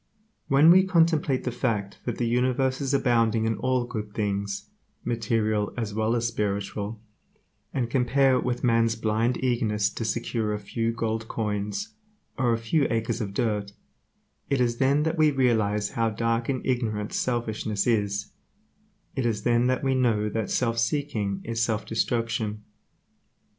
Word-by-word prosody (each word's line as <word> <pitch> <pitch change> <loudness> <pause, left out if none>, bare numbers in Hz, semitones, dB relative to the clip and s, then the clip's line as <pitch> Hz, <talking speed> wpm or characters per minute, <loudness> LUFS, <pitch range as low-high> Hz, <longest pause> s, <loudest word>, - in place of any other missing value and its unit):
When 145 +4 +6
we 185 +2 +8
contemplate 165 -7 +2
the 125 - -1
fact 110 -5 -2
that 120 - -2
the 120 - 0
universe 130 +3 +1
is 135 -1 -1
abounding 115 -5 +2
in 110 0 +1
all 130 -1 +1
good 105 -4 -6
things, 100 -1 -2 0.3
material 110 -3 0
as 110 -4 -3
well 110 +2 +1
as 115 -1 0
spiritual, 105 0 -3 0.7
and 125 -3 -1
compare 130 +2 +3
it - - 0
with 125 -1 -2
man's 115 -2 +3
blind 115 +2 0
eagerness 110 -5 +1
to - - -5
secure 110 -1 -1
a - - -4
few 115 +3 -2
gold 110 0 -2
coins, 105 - -2 0.5
or 125 -2 +1
a 115 - +2
few 115 +6 +1
acres 115 +1 -1
of 100 -2 -4
dirt, 105 -3 -1 0.8
it 140 -2 +1
is 120 -1 +1
then 140 +3 +3
that 160 +1 -1
we 155 -1 +6
realize 110 -7 +1
how 115 -1 +1
dark 115 +2 -1
and 130 -2 -2
ignorant 110 -5 -1
selfishness 110 -4 -1
is; 105 -3 0 0.8
it 130 - -1
is 115 -3 -1
then 120 0 +3
that 130 +1 0
we 135 -1 +2
know 115 -5 +2
that 110 0 -2
self 115 -2 0
seeking 115 -6 -1
is 115 0 -2
self 110 -2 0
destruction. 115 -2 -1
115 Hz, 160 wpm, -26 LUFS, 105-125 Hz, 0.8 s, we